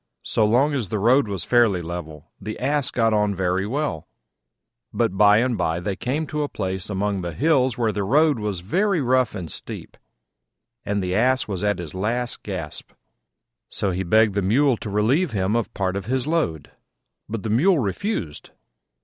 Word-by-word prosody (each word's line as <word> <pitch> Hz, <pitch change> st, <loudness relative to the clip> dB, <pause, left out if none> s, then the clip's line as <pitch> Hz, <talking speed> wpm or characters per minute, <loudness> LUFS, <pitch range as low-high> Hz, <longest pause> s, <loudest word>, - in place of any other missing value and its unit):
So 110 Hz, -, +1 dB
long 135 Hz, +7 st, +3 dB
as 120 Hz, -9 st, -2 dB
the 110 Hz, -, -1 dB
road 120 Hz, +5 st, +3 dB
was 100 Hz, -3 st, -3 dB
fairly 115 Hz, -8 st, +3 dB
level, 80 Hz, -2 st, -7 dB
the 110 Hz, -, -5 dB
Ass 140 Hz, 0 st, +1 dB
got 115 Hz, -2 st, +1 dB
on 105 Hz, -1 st, +1 dB
very 95 Hz, +1 st, 0 dB
well: 140 Hz, -, -3 dB, 0.8 s
but 95 Hz, -, 0 dB
by 105 Hz, +1 st, +6 dB
and 120 Hz, +1 st, +1 dB
by 85 Hz, -4 st, -1 dB
they 95 Hz, +2 st, -3 dB
came 140 Hz, +9 st, -2 dB
to 150 Hz, 0 st, -3 dB
a 145 Hz, -, -2 dB
place 95 Hz, -2 st, -4 dB
among 100 Hz, -1 st, -1 dB
the 85 Hz, -2 st, -5 dB
hills 130 Hz, -, +2 dB
where 115 Hz, -3 st, +1 dB
the 105 Hz, -1 st, -2 dB
road 145 Hz, +5 st, +3 dB
was 105 Hz, -4 st, -3 dB
very 185 Hz, -, +1 dB
rough 130 Hz, -4 st, +1 dB
and 90 Hz, -4 st, -5 dB
steep, -, -, -7 dB, 0.9 s
and 100 Hz, -2 st, -1 dB
the 90 Hz, 0 st, -2 dB
Ass 130 Hz, +5 st, +2 dB
was 100 Hz, -2 st, -4 dB
at 105 Hz, 0 st, +1 dB
his 85 Hz, -4 st, -7 dB
last 115 Hz, +6 st, -2 dB
gasp. 90 Hz, -7 st, -6 dB, 0.8 s
So 100 Hz, -, -1 dB
he 90 Hz, +1 st, -2 dB
begged 110 Hz, +3 st, +3 dB
the 100 Hz, -, 0 dB
Mule 125 Hz, +8 st, +3 dB
to 105 Hz, -, -6 dB
relieve 115 Hz, -, +1 dB
him 100 Hz, +1 st, 0 dB
of 115 Hz, -, 0 dB
a -, -, -18 dB
part 95 Hz, -1 st, -1 dB
of 100 Hz, -2 st, -4 dB
his 130 Hz, 0 st, 0 dB
load: 150 Hz, -, -1 dB, 0.6 s
but 110 Hz, -2 st, -4 dB
the 110 Hz, -, -2 dB
Mule 165 Hz, -, +4 dB
refused. 110 Hz, -, -3 dB
105 Hz, 190 wpm, -23 LUFS, 95-130 Hz, 0.9 s, by